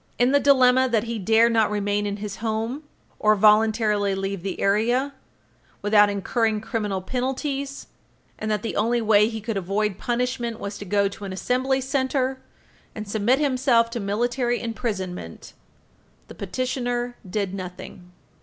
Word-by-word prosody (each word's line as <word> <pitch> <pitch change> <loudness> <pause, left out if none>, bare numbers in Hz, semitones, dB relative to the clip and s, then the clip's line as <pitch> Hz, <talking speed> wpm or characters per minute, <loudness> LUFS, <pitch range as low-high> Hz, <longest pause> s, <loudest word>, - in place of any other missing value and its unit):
In 245 +2 +3
the 285 - +5
dilemma 260 -2 +4
that 225 -3 +1
he 230 -1 -4
dare 225 +4 +4
not 225 -2 +2
remain 205 0 -1
in 200 0 -3
his 205 -1 -6
home, 225 +5 -2 0.4
or 215 0 +4
voluntarily 210 -1 +3
leave 195 -1 -3
the 190 0 -4
area, 240 +7 +1 0.7
without 205 0 +5
incurring 215 +2 0
criminal 210 -4 -3
penalties, 270 +4 -3 0.5
and 215 - -3
that 210 -2 -1
the 230 - -3
only 235 +3 +1
way 215 -1 +4
he 225 -1 -5
could 220 -1 -3
avoid 195 +1 -1
punishment 240 -1 -2
was 200 +1 -5
to 205 - -7
go 200 +1 +2
to 200 +1 -9
an 195 - -5
Assembly 260 +6 0
Center 265 0 -1 0.5
and 215 -1 -6
submit 220 +5 +2
himself 255 -5 +2
to 235 - -3
military 240 +4 0
imprisonment, 195 - -5 0.8
the - - -9
petitioner 245 +3 -3
did 200 -1 -2
nothing. 180 -1 -8
220 Hz, 150 wpm, -24 LUFS, 205-250 Hz, 0.8 s, the